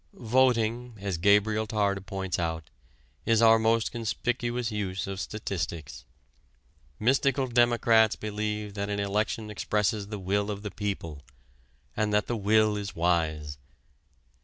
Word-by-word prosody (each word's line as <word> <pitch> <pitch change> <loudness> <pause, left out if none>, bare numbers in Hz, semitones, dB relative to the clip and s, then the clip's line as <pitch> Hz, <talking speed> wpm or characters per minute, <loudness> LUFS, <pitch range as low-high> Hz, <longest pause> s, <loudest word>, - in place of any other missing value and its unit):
Voting, 120 -1 +1
as 95 -4 -3
Gabriel 105 +3 +3
Tarde 100 -3 0
points 95 -2 -3
out, 80 -2 -3 0.5
is 115 -1 +3
our 115 -1 +6
most 115 0 +2
conspicuous 120 0 -2
use 100 -2 -3
of 95 -1 -5
statistics. 90 -8 -5 0.9
Mystical 135 +3 +2
democrats 120 -2 +4
believe 105 -1 -4
that 100 0 -3
an 100 0 -2
election 105 +2 -1
expresses 105 -1 -1
the 105 0 -5
will 100 +2 -1
of 100 0 -5
the 105 - -5
people, 90 -8 -4 0.7
and 105 -1 0
that 105 0 +2
that 120 - -2
will 110 +1 +3
is 100 -1 -5
wise. 80 -4 0
105 Hz, 130 wpm, -28 LUFS, 100-110 Hz, 0.9 s, our